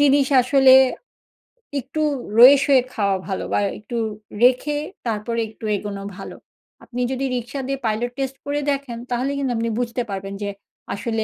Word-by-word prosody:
জিনিস 280 Hz, -1 st, +4 dB, 0.2 s
আসলে 265 Hz, 0 st, +6 dB, 1.1 s
একটু 275 Hz, +5 st, -4 dB, 0.4 s
রয়েসয়ে 270 Hz, +1 st, +8 dB
খাওয়া 200 Hz, -2 st, +1 dB
ভালো 190 Hz, -, -3 dB
বা -, -, +3 dB, 0.2 s
একটু 225 Hz, +3 st, -6 dB, 0.5 s
রেখে 260 Hz, +4 st, +3 dB, 0.3 s
তারপরে 230 Hz, +1 st, -2 dB
একটু 220 Hz, 0 st, -11 dB
এগোনো 200 Hz, -1 st, -6 dB, 0.2 s
ভালো। -, -, -8 dB, 0.5 s
আপনি 250 Hz, 0 st, -5 dB
যদি 265 Hz, +1 st, -2 dB
রিক্সা 245 Hz, +3 st, -4 dB
দিয়ে 275 Hz, 0 st, -2 dB
পাইলট 225 Hz, +3 st, -1 dB
টেস্ট 270 Hz, 0 st, -2 dB
করে 290 Hz, +1 st, -1 dB
দেখেন, 275 Hz, -4 st, -4 dB
তাহলে 255 Hz, +3 st, 0 dB
কিন্তু 270 Hz, -3 st, -1 dB
আপনি 230 Hz, 0 st, -1 dB
বুঝতে 245 Hz, 0 st, -2 dB
পারবেন 195 Hz, 0 st, -5 dB
যে 200 Hz, -, -2 dB, 0.4 s
আসলে 225 Hz, +1 st, -2 dB
245 Hz, 150 wpm, -22 LUFS, 220-275 Hz, 1.1 s, রয়েসয়ে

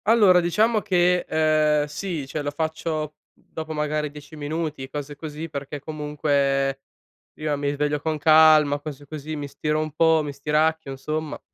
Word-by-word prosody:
Allora 205 Hz, -5 st, +6 dB
diciamo 215 Hz, +6 st, +2 dB
che, 180 Hz, -3 st, +2 dB
ehm, 155 Hz, -1 st, +3 dB
sì, 155 Hz, 0 st, -4 dB
cioè 150 Hz, +3 st, -4 dB
lo 145 Hz, -, -2 dB
faccio 155 Hz, 0 st, -3 dB
dopo 160 Hz, 0 st, -9 dB
magari 150 Hz, 0 st, -1 dB
10 150 Hz, +1 st, -12 dB
minuti, 150 Hz, -2 st, -4 dB
cose 145 Hz, 0 st, -6 dB
così, 155 Hz, +2 st, -6 dB
perché 145 Hz, -1 st, -6 dB
comunque 140 Hz, -2 st, 0 dB, 0.6 s
io 155 Hz, -1 st, -2 dB
mi 140 Hz, 0 st, -1 dB
sveglio 145 Hz, +1 st, -1 dB
con 160 Hz, 0 st, -1 dB
calma, 155 Hz, -1 st, +6 dB
cose 145 Hz, -1 st, -8 dB
così, 155 Hz, +1 st, -6 dB
mi 145 Hz, -1 st, -5 dB
stiro 150 Hz, +2 st, -2 dB
un 155 Hz, 0 st, -2 dB
po', 160 Hz, 0 st, +4 dB
mi 145 Hz, -1 st, -5 dB
stiracchio 155 Hz, +1 st, 0 dB
insomma. 155 Hz, +3 st, -4 dB
150 Hz, 155 wpm, -24 LUFS, 145-160 Hz, 0.6 s, Allora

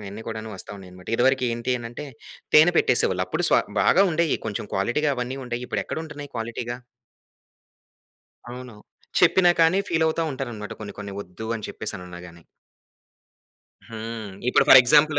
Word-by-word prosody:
ఇయన్నీ 100 Hz, +3 st, -8 dB
కూడాను 110 Hz, 0 st, -6 dB
వస్తున్నాయన్నమాట. 90 Hz, -1 st, -10 dB
ఇదివరకి 130 Hz, +1 st, +2 dB
ఏంటి 120 Hz, +2 st, -1 dB
అనంటే 120 Hz, +5 st, -7 dB, 0.5 s
తేనె 160 Hz, +4 st, +7 dB
పెట్టేసేవాళ్ళు. 95 Hz, -6 st, +2 dB
అప్పుడు 90 Hz, -, -1 dB
స -, -, +1 dB, 0.3 s
బాగా 195 Hz, -, +5 dB
ఉండేయి 160 Hz, -1 st, +1 dB
కొంచెం 105 Hz, -1 st, -4 dB
క్వాలిటీగా 120 Hz, +9 st, +1 dB
అవన్నీ 125 Hz, +2 st, -3 dB
ఉండేయి. 120 Hz, 0 st, -4 dB
ఇప్పుడెక్కడుంటున్నాయి 150 Hz, -3 st, -5 dB
క్వాలిటీగా? 120 Hz, +1 st, -4 dB, 1.7 s
అవును. 125 Hz, -1 st, -9 dB, 0.4 s
చెప్పినా 180 Hz, -2 st, +5 dB
కాని 165 Hz, +4 st, +4 dB
ఫీల్ 160 Hz, -1 st, +1 dB
అవుతా 160 Hz, +1 st, 0 dB
ఉంటారన్నమాట. 120 Hz, -6 st, -6 dB
కొన్ని 105 Hz, -, -7 dB
కొన్ని 100 Hz, -1 st, -6 dB
వద్దు 100 Hz, +3 st, -9 dB
అని 110 Hz, -, -7 dB
చెప్పేసినన్నా 90 Hz, -4 st, -6 dB
గాని. 85 Hz, -1 st, -15 dB, 1.5 s
హ్మ్. 110 Hz, -2 st, -6 dB, 0.2 s
ఇప్పుడు -, -, +4 dB
ఫోర్ 130 Hz, -, +11 dB
ఎగ్జాంపుల్ 145 Hz, +4 st, +4 dB
120 Hz, 135 wpm, -24 LUFS, 105-145 Hz, 1.7 s, ఫోర్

